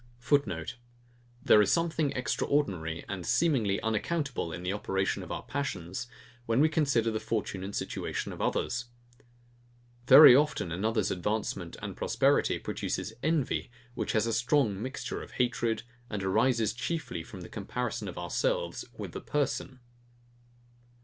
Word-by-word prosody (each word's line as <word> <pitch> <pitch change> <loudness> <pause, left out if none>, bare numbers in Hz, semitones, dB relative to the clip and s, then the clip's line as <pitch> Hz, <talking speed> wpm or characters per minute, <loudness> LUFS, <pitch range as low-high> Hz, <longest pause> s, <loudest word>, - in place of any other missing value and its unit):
[Footnote: 120 - 0 0.7
There 105 - +7
is 105 - +2
something 165 -3 +1
extraordinary, 95 - -1
and 95 -3 -4
seemingly 115 - +2
unaccountable 125 - -1
in 90 +2 -6
the 90 +2 -1
operation 95 -2 -1
of - - -8
our - - -4
passions, 115 -6 -4 0.4
when 115 +2 +2
we 155 +2 +5
consider 135 -8 +2
the 110 - -1
fortune 105 -4 -3
and 100 +1 -5
situation - - -3
of - - -7
others. 120 - -1 1.2
Very 125 - +11
often 140 - +1
another's 105 +4 0
advancement 95 -2 -2
and - - -5
prosperity - - +2
produces 110 - -3
envy, 155 -5 0 0.2
which 125 - -2
has 110 0 +2
a 115 - -1
strong 120 -4 +2
mixture 130 +3 -4
of - - -11
hatred, 120 -2 0 0.3
and 105 -2 -3
arises 110 +3 +2
chiefly 120 - -3
from 95 +2 -10
the 85 - -8
comparison 115 +1 -4
of 90 - -7
ourselves 90 -1 -1
with - - -6
the - - -6
person. 135 -3 -2
115 Hz, 140 wpm, -30 LUFS, 95-135 Hz, 1.2 s, Very